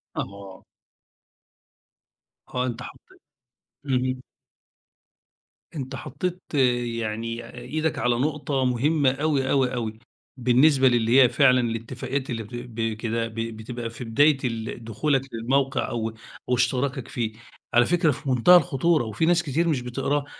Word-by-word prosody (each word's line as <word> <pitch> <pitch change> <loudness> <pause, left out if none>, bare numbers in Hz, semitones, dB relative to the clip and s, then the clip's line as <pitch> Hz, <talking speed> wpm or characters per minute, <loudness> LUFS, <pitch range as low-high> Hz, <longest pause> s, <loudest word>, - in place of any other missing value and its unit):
أها. 100 -1 -7 1.9
آه 125 - +1
أنتَ 125 -1 -4
حطيت - - -14 0.7
اهم. 130 -1 0 1.5
أنتَ 130 -3 -5
حطيت 180 +6 -4 0.6
يعني 115 +1 -4
إيدك 155 +4 -2
على 120 +1 +2
نقطة 140 0 -1
مهمّة 135 +3 +2
أوي، 140 -1 0
أوي، 130 -2 +2
أوي، 110 -2 -4 0.4
بالنسبة 130 +3 +4
للي 120 +1 +4
هي 125 - +6
فعلًا 130 -2 +4
الاتفاقيات 120 +4 -3
اللي 115 -3 -3
بتب 120 +1 -9
بكده 115 0 -2
ب 115 - -12
بتبقى 115 +1 -5
في 115 - -8
بداية 140 +6 +4
ال 115 -1 -4
دخولك 125 +5 0
للموقع 130 +4 0
أو 115 -1 -2 0.4
أو 125 - +3
اشتراكك 125 +1 0
فيه، 115 -4 -3 0.4
على 120 0 +5
فكرة 170 -1 +2
في 140 +1 -5
منتهى 130 +8 +6
الخطورة 170 -3 +2
وفي 110 +9 -1
ناس 170 0 +3
كتير 165 +3 0
مش 140 -6 +1
بتقراها، 135 +4 -1
125 Hz, 130 wpm, -25 LUFS, 115-140 Hz, 1.9 s, هي